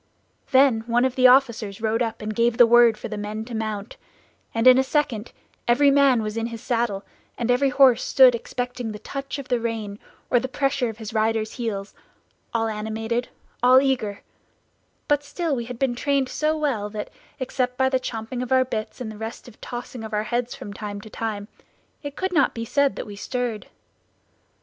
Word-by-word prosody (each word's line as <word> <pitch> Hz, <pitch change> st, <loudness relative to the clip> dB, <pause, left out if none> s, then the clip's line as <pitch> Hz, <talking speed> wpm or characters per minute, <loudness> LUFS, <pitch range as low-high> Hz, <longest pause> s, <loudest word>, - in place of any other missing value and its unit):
"Then 265 Hz, -4 st, +5 dB
one 240 Hz, +1 st, +3 dB
of 260 Hz, -, 0 dB
the 255 Hz, 0 st, +6 dB
officers 235 Hz, -6 st, +3 dB
rode 225 Hz, +1 st, 0 dB
up 225 Hz, -2 st, -2 dB
and 215 Hz, 0 st, -3 dB
gave 235 Hz, +1 st, +1 dB
the 240 Hz, -, +8 dB
word 235 Hz, -1 st, +6 dB
for -, -, -6 dB
the 215 Hz, -2 st, -5 dB
men 215 Hz, +1 st, -4 dB
to 240 Hz, -, -9 dB
mount, 215 Hz, -1 st, -4 dB, 0.5 s
and 225 Hz, +1 st, -1 dB
in 255 Hz, 0 st, +8 dB
a -, -, +4 dB
second 260 Hz, -6 st, -1 dB, 0.4 s
every 280 Hz, +4 st, +5 dB
man 275 Hz, -5 st, +4 dB
was 215 Hz, +1 st, -4 dB
in 230 Hz, 0 st, -1 dB
his 230 Hz, -1 st, -7 dB
saddle, 230 Hz, -4 st, -1 dB, 0.3 s
and 240 Hz, 0 st, 0 dB
every 270 Hz, +3 st, +3 dB
horse 255 Hz, -2 st, +5 dB
stood 260 Hz, -2 st, +6 dB
expecting 245 Hz, 0 st, -4 dB
the -, -, -6 dB
touch 275 Hz, +1 st, -5 dB
of 275 Hz, -2 st, -7 dB
the 245 Hz, -, +2 dB
rein, 220 Hz, -3 st, -4 dB, 0.3 s
or 245 Hz, -, +5 dB
the 260 Hz, -, -3 dB
pressure 270 Hz, -1 st, 0 dB
of 220 Hz, -, -8 dB
his 220 Hz, -1 st, -7 dB
rider's 220 Hz, 0 st, 0 dB
heels, 210 Hz, -5 st, -4 dB, 0.6 s
all 225 Hz, -1 st, 0 dB
animated, 220 Hz, +2 st, -3 dB, 0.3 s
all 250 Hz, +1 st, +7 dB
eager; 255 Hz, -7 st, -1 dB, 0.8 s
but 290 Hz, 0 st, +2 dB
still 300 Hz, +1 st, -2 dB
we 235 Hz, -2 st, -3 dB
had 250 Hz, 0 st, -7 dB
been 265 Hz, -1 st, +1 dB
trained 275 Hz, +1 st, 0 dB
so 310 Hz, +1 st, 0 dB
well 255 Hz, -9 st, -1 dB
that, 210 Hz, 0 st, -6 dB, 0.3 s
except 250 Hz, -1 st, -2 dB
by 265 Hz, 0 st, +3 dB
the 260 Hz, -1 st, +1 dB
champing 235 Hz, 0 st, -5 dB
of 250 Hz, -, -5 dB
our 260 Hz, 0 st, +4 dB
bits, 220 Hz, 0 st, -5 dB
and 220 Hz, -3 st, -4 dB
the 215 Hz, -, -10 dB
restive 225 Hz, +1 st, -8 dB
tossing 245 Hz, -1 st, -7 dB
of 220 Hz, -1 st, -7 dB
our 210 Hz, 0 st, +1 dB
heads 240 Hz, +2 st, -2 dB
from 205 Hz, -, -8 dB
time 205 Hz, 0 st, -6 dB
to 215 Hz, +1 st, -12 dB
time, 210 Hz, -3 st, -4 dB, 0.5 s
it 285 Hz, -1 st, -7 dB
could 375 Hz, -1 st, -2 dB
not 295 Hz, -5 st, +3 dB
be 230 Hz, 0 st, -4 dB
said 280 Hz, +3 st, +2 dB
that -, -, -5 dB
we 205 Hz, -, -9 dB
stirred. 240 Hz, 0 st, -3 dB
240 Hz, 200 wpm, -24 LUFS, 220-260 Hz, 0.8 s, the